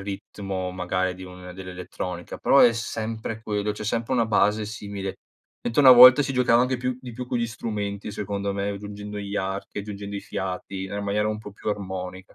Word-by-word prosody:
ritmo, 95 -1 -5
magari, 90 0 -1
di 95 - -9
un 90 0 -10
dell'elettronica, 90 -1 -6
però 140 - +5
è 120 - +7
sempre 110 -1 -4
quello. 105 -1 -1
C'è 105 +1 -7
sempre 115 +3 -1
una 115 -2 +2
base 105 0 +2
simile. 100 -2 -5 0.5
Mentre 120 +5 +2
una 130 -2 +11
volta 125 +3 +10
si 135 - -2
giocava 125 -2 +4
anche 130 0 0
più 125 0 -2
di 125 -2 -8
più 125 +2 -6
con 125 - -1
gli 115 - 0
strumenti, 105 -3 -4
secondo 100 0 -3
me, 100 0 -1
aggiungendo 105 +1 -6
gli 100 0 -5
archi, 95 +1 -3
aggiungendo 100 0 -6
i 100 - -4
fiati, 95 0 -4
era 100 +2 -4
maniera 105 +1 0
un 105 0 -2
po' 105 - -9
più 100 - -6
armonica. 95 -1 -5
105 Hz, 195 wpm, -25 LUFS, 95-115 Hz, 0.5 s, una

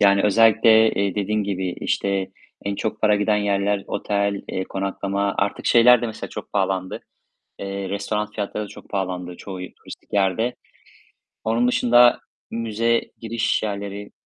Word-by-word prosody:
Yani, 100 -1 +5
özellikle, 110 +1 +5
eee, 100 -1 0
dediğin 105 +1 0
gibi, 95 -2 -2
işte, 100 -1 -1 0.3
en 100 0 -1
çok 110 +1 -3
para 105 -1 +4
giden 105 +1 +2
yerler 100 -1 0
otel, 100 -1 -1
eee, 95 - -2
konaklama. 100 +1 -2
Artık 100 0 -1
şeyler 120 +1 +6
de - - 0
mesela 110 - -6
çok - - -8
pahalandı, 95 -1 -1 0.6
eee, 100 -1 -4
restoran 105 +1 -2
fiyatları 105 0 -4
da - - -10
çok - - -13
pahalandı 90 -2 -3
çoğu 95 0 -8
turistik 90 0 -11
yerde. 100 +4 +1 0.9
Onun 115 +2 +2
dışında 120 0 +5 0.3
müze 115 +1 0 0.2
giriş 115 0 -1
yerleri 100 -1 -5
100 Hz, 145 wpm, -22 LUFS, 100-110 Hz, 0.9 s, şeyler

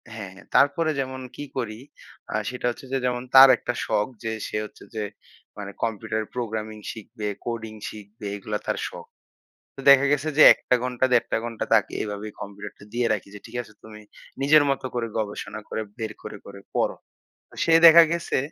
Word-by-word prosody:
হ্যাঁ, 100 -4 -7
হ্যাঁ। - - -15
তারপরে 155 +3 +4
যেমন 130 -1 -3
কি 145 - -6
করি 110 -3 -3 0.5
আ - - -1
সেটা 125 -1 -6
হচ্ছে 120 +2 -7
যে 135 - +1
যেমন 125 0 -1
তার 135 0 +11
একটা 120 - -3
শখ 105 - +1 0.2
যে 110 - -2 0.2
সে - - -3
হচ্ছে - - -14
যে 110 - -2 0.5
মানে 100 -1 -6
কম্পিউটার 110 0 -2
প্রোগ্রামিং 110 -3 -4
শিখবে, 110 0 -7 0.2
কোডিং 115 -2 -4 0.2
শিখবে 105 0 -11
এগুলা 105 +1 -4
তার - - 0
শখ। - - -10 0.7
তো 135 - -8
দেখা 140 0 +6
গেছে 145 +2 +1
যে - - +9
১ - - -16
টা 125 - +6
ঘন্টা 125 0 0
১.৫ 120 - +4
টা - - +2
ঘন্টা 115 -2 -4
তাকে - - +3
এভাবে 105 0 -5
কম্পিউটারটা 100 0 -9
দিয়ে 120 0 +1
রাখি। 105 - -4
যে - - -8
ঠিক 120 +1 -12
আছে 110 -2 -15
তুমি 105 -1 -12 0.4
নিজের 150 +2 +6
মত 135 0 -1
করে 120 -1 -1
গবেষণা 110 0 -4
করে 110 - -3 0.2
বের 110 -2 -4
করে, 105 - -7
করে 100 0 -10 0.2
পড়ো। - - +1 0.5
তো - - -18
সে 165 - +3
দেখা 165 +1 +10
গেছে 170 0 -1
115 Hz, 190 wpm, -24 LUFS, 105-130 Hz, 0.7 s, তার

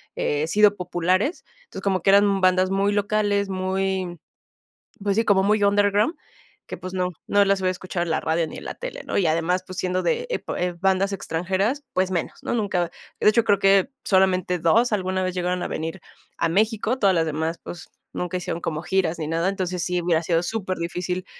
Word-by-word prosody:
eh, 150 +1 -1
sido 205 +3 +4
populares. 185 - 0 0.2
Entonces, 195 - -9
como 190 -3 +1
que 195 - +4
eran 200 0 +4
bandas 185 0 +3
muy 200 +1 +1
locales, 205 -1 +1
muy, 190 -1 -2 0.9
pues, 200 -1 0
sí, 225 - +3
como 195 -2 +4
muy 205 +1 +2
underground, 205 - +3 0.5
que, - - -6
pues, 185 0 -7
no 180 -1 0 0.2
no 205 0 +4
las 195 0 +2
hubiera 185 -1 +1
escuchado 180 -1 -3
en 170 - -5
la 160 - +1
radio 160 +1 0
ni - - -9
en - - -9
la - - -5
tele, - - -7
¿no? - - -1
Y 190 - +2
además, 165 +3 +1
pues, 185 - -8
siendo 185 0 0
de 480 0 0
epo - - -3
eh, 180 0 -1
bandas 195 +1 +2
extranjeras, 195 - -1
pues, 185 0 +1
menos, 175 -3 -3
¿no? - - -2
Nunca, 190 -6 0 0.3
de - - +5
hecho, 225 +1 +4
creo 205 -3 +3
que 195 +5 +4
solamente 185 -2 +2
2 220 +9 +3
alguna 185 -2 0
vez 185 0 -2
llegaron 180 0 -1
a - - -2
venir 165 +3 -4 0.4
a 165 - +1
México, 220 +6 +1
todas 195 -5 +3
las 165 -1 +1
demás, 160 +2 -2
pues, 175 - -9 0.2
nunca 180 +1 -2
hicieron 175 -1 -4
como 155 -1 -2
giras 175 -3 0
ni 155 - -3
nada. 165 +3 +1
Entonces, 185 -3 -2
sí 180 0 -1
hubiera 170 -1 +1
sido 165 0 +1
súper 190 -2 -3
difícil 180 +2 -3
185 Hz, 205 wpm, -23 LUFS, 175-200 Hz, 0.9 s, de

